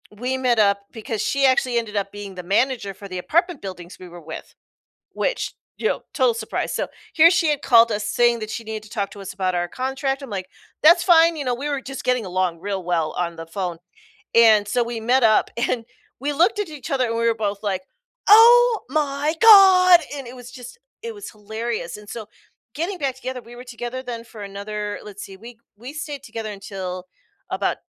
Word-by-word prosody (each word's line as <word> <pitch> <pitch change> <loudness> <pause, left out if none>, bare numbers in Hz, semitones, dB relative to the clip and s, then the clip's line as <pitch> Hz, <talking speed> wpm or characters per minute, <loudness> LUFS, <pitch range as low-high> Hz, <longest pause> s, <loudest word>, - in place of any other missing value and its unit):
we 255 +4 -2
met 250 -3 +1
up 200 -1 +3
because 225 -1 -5
she 275 0 +1
actually 260 -2 +2
ended 225 -3 -3
up 200 -1 -2
being 205 -2 -8
the 180 - -7
manager 205 +2 0
for 200 +1 -11
the 185 -1 -6
apartment 340 - 0
buildings 180 -2 -9
we 180 - -11
were 175 0 -11
with. 160 +1 -9 0.6
Which, - - -2 0.2
you 440 - 0
know, - - -2
total 255 -5 +3
surprise, 220 -1 -3
so, - - -2 0.3
here 330 +2 +7
she 335 -3 +2
had 295 -1 0
called 230 -2 +6
us 210 0 -2
saying 240 +1 +2
that 215 -1 -6
she 230 - -5
needed 220 -1 -6
to 215 - -15
talk 200 -2 -3
to 200 - -10
us 195 0 -7
about 185 -2 -1
our 175 0 -1
contract, 270 - -3
I'm, 275 - -9
like, 190 -3 -5 0.4
"That's 340 +2 +7
fine," 335 -2 +5
you 295 - -4
know, 250 -1 0
we 280 +4 -5
were 280 -2 -2
just 270 +1 -7
getting 250 -3 0
along 180 -2 -1
real 195 0 -4
well 165 -3 -1
on 170 -1 -2
the 165 0 -8
phone 175 -1 -4 0.6
and 220 -3 +6
so, 245 +4 +1
we 235 -1 -5
met 245 +3 +2
up 215 -1 +4
and 235 0 -1 0.4
we 290 +2 -1
looked 360 +9 +2
at 410 - -3
each 300 -2 -9
other 260 -2 +1
and 230 - -2
we 230 0 0
were 230 - +3
both, 205 -2 -3
like, 190 -2 -1 0.5
"Oh 465 +1 +7
my 295 0 0
god" 375 -5 +8 0.2
and 275 -2 -7
it 250 +2 -10
was 245 0 -11
just 250 - -11 0.2
it 460 -1 -6
was 410 - -9
hilarious 220 -3 -5
and 210 0 -14
so 225 -3 -7 0.5
getting 350 +5 -3
back 275 -5 -1
together 260 -1 -6
we 240 +1 -13
were 245 - -10
together 245 +1 -6
then 240 -3 -6
for 220 -2 -11
another 205 +1 -5
let's 205 -1 -9
see, 195 - -11
we 230 +3 -13 0.2
we 245 +6 -9
stayed 295 -2 -6
together 220 -1 -6
until 190 -2 -7 0.4
about - - -1
235 Hz, 215 wpm, -22 LUFS, 200-275 Hz, 0.6 s, god